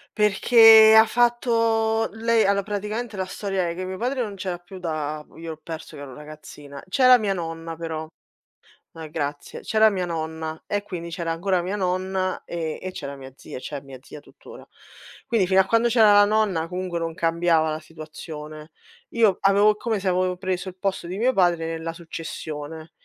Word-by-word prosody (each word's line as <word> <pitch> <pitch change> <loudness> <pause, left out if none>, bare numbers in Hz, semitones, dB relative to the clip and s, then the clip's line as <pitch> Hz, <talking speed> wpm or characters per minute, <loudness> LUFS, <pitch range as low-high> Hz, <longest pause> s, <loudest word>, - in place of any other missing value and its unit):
Perché 220 +1 +7
ha 220 - +8
fatto 230 -2 +1
lei 225 0 +2
allo 200 0 +2
praticamente, 210 +2 -4
la 185 - -2
storia 190 -2 -2
è 170 - -5
che 185 +1 -5
mio 185 0 -5
padre 250 +3 -1
non 210 - -6
c'era 185 -2 -4
più 175 +2 -12
da 155 -3 -4
b - - -21
io 165 0 -7
l'ho 155 - -8
perso 160 0 -8
che 145 - -9
ero 135 -3 -9
ragazzina. 150 -2 -11
C'era 255 +4 +6
mia 205 -3 0
nonna, 165 -2 -5
però 160 -1 -5 0.8
ma 160 -1 -9
grazie. 145 -2 -5
C'era 220 0 +4
mia 190 -3 -2
nonna 160 -1 -5
e 205 - -1
quindi 170 -4 -7
c'era 170 -1 -3
ancora 180 +2 0
mia 190 +4 -3
nonna 185 0 -2
e 165 -2 -4
e 185 - -5
c'era 140 -4 -7
mia 135 -1 -11
zia, - - -9
c'è 140 +2 -6
mia 135 -1 -12
zia 150 - -11
tuttora. - - -15 0.6
Quindi 215 -6 +1
fino 190 0 +5
a - - -1
quando 230 +2 +2
c'era 225 -3 +5
la 205 0 +7
nonna 205 -6 +1
comunque 180 0 -4
non 165 -1 -3
cambiava 165 -2 +1
la 155 - -3
situazione. 155 -1 -10 0.4
Io 220 -5 +3
avevo 200 +2 +4
come 215 -2 -2
se 195 - 0
avo 185 0 0
preso 185 0 -3
il 185 - -7
posto 190 -2 -3
di 185 - -5
mio 245 +5 +2
padre 175 -7 +2
nella 165 0 -4
successione. 160 -1 -7
180 Hz, 185 wpm, -23 LUFS, 160-210 Hz, 0.8 s, ha